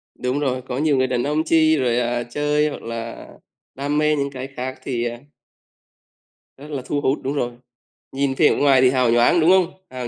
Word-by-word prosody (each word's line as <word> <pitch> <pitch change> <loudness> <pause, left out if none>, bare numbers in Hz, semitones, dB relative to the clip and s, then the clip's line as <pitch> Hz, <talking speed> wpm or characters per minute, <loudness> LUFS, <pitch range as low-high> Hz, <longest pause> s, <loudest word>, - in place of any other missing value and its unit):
Đúng 125 +3 -2
rồi, 130 -3 -1
có 125 0 -6
nhiều 150 -1 +2
người 130 0 +2
đàn 125 -1 -1
ông 150 +2 0
chi 160 -1 +3
rồi, 125 -2 +1
à, 120 0 -1
chơi 150 +4 0
hoặc 145 - -8
là 115 0 -7 0.5
đam 145 +2 -2
mê 150 0 +2
những 140 -1 -1
cái 130 0 -6
khác 130 +1 -5
thì, 120 -3 -2
à 120 0 -4 1.4
rất 150 +3 -11
là 135 -3 -3
thu 145 +1 -2
hút, 135 0 0
đúng 135 +2 -2
rồi. 125 -4 -2 0.6
Nhìn 135 0 -1
vẻ 150 +3 +3
ngoài 135 -3 +4
thì 130 - +5
hào 125 -3 +2
nhoáng, 120 +8 +4
đúng 160 - +4
không? 185 -1 +4 0.2
Hào 125 -1 -6
135 Hz, 210 wpm, -21 LUFS, 125-150 Hz, 1.4 s, thì